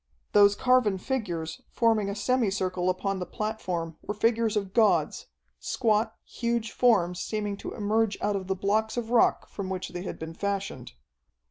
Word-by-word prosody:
Those 205 -1 +6
carven 250 -6 +3
figures, 175 -9 -3
forming 225 -4 +2
a 200 - -3
semi 240 +1 +1
circle 185 -2 -1
upon 195 +1 -1
the 180 - -3
platform 180 -7 -3
were 210 - -4
figures 225 0 +2
of 195 -2 -3
gods, 190 -9 +2 0.3
squat, 220 - +1
huge 235 -2 -2
forms 180 -8 +3
seeming 210 +1 -2
to - - -6
emerge 215 0 +1
out 205 - 0
of 190 -2 -4
the 190 - 0
blocks 215 +4 0
of 235 -1 -3
rock 245 - +3
from 195 -2 -6
which 185 -1 -3
they 175 - -6
had 185 - -5
been 160 +1 -7
fashioned. 195 - -3
205 Hz, 165 wpm, -27 LUFS, 185-220 Hz, 0.3 s, Those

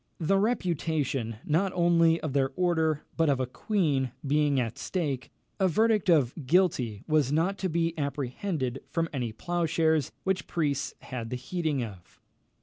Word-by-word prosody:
The 195 +4 +2
reputation, 160 - 0
not 180 +6 +1
only 170 -1 +4
of 155 -4 -3
their 135 -1 +2
order, 160 -4 +1
but 165 -2 +3
of 135 -2 +2
a 130 - +1
queen, 140 - 0
being 145 -1 +2
at 115 -2 -3
stake, 145 -9 -2 0.3
a 190 - +4
verdict 215 +2 +2
of 145 -8 +4
guilty 140 - +2
was 150 -4 +2
not 175 +6 +1
to 190 - -1
be 165 0 0
apprehended 140 0 -2
from 165 0 -1
any 125 -5 -2
ploughshares 160 +1 0
which 190 -1 -1
priests 140 -5 -1
had 120 -3 -6
the 125 - -3
heating 150 0 -2
of. 95 -6 -10
155 Hz, 150 wpm, -28 LUFS, 135-175 Hz, 0.3 s, only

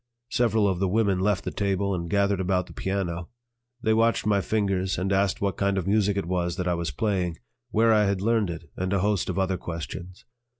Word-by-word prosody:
Several 110 -3 +2
of 95 -3 0
the 95 - +1
women 100 -1 +2
left 100 -1 +1
the - - -3
table 100 0 0
and 85 -2 -3
gathered 100 0 +2
about 90 -1 +1
the - - -13
piano. 90 -3 -3 0.5
They 110 - +3
watched 115 0 +2
my 100 -2 +3
fingers 95 -1 0
and 95 +2 0
asked 100 0 +1
what 100 -3 0
kind 100 0 +1
of 95 - -1
music 100 0 +2
it 100 - -1
was 85 -1 -1
that 90 -1 -2
I 90 - +2
was 85 -2 -2
playing, 90 - -1 0.3
where 115 +1 +4
I 105 -1 +4
had 100 -1 0
learned 110 -1 +1
it, 85 -1 -7
and 95 0 -2
a 95 - +2
host 100 -2 +1
of 90 - -2
other 95 -1 +1
questions. 85 +2 -7
95 Hz, 220 wpm, -26 LUFS, 90-100 Hz, 0.5 s, where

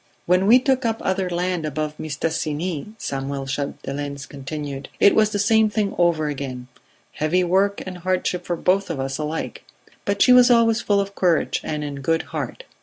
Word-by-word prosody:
"When 180 +2 +3
we 235 +4 +8
took 260 0 +1
up 225 -1 0
other 190 -1 0
land 175 -1 -1
above 155 0 -3
Mistassini," 160 +4 -3
Samuel 135 -5 -4
Chapdelaine 140 0 -4
continued, 140 0 -6
"it 200 - +6
was 215 -1 +4
the 210 - -2
same 220 +1 +3
thing 210 -2 -1
over 170 -3 +2
again; 130 -3 -5 0.4
heavy 170 +4 +1
work 195 +3 +1
and 185 -1 -7
hardship 180 0 -1
for 175 - -2
both 190 +3 +1
of 160 -5 -3
us 135 +1 -3
alike; 155 +1 -4 0.4
but 200 0 -1
she 250 - +6
was 250 0 +7
always 230 -1 +4
full 205 -1 +2
of 200 0 -2
courage 175 -4 +1
and 150 -1 -3
in 140 -1 -5
good 165 +4 +1
heart - - -4
175 Hz, 180 wpm, -22 LUFS, 145-200 Hz, 0.4 s, we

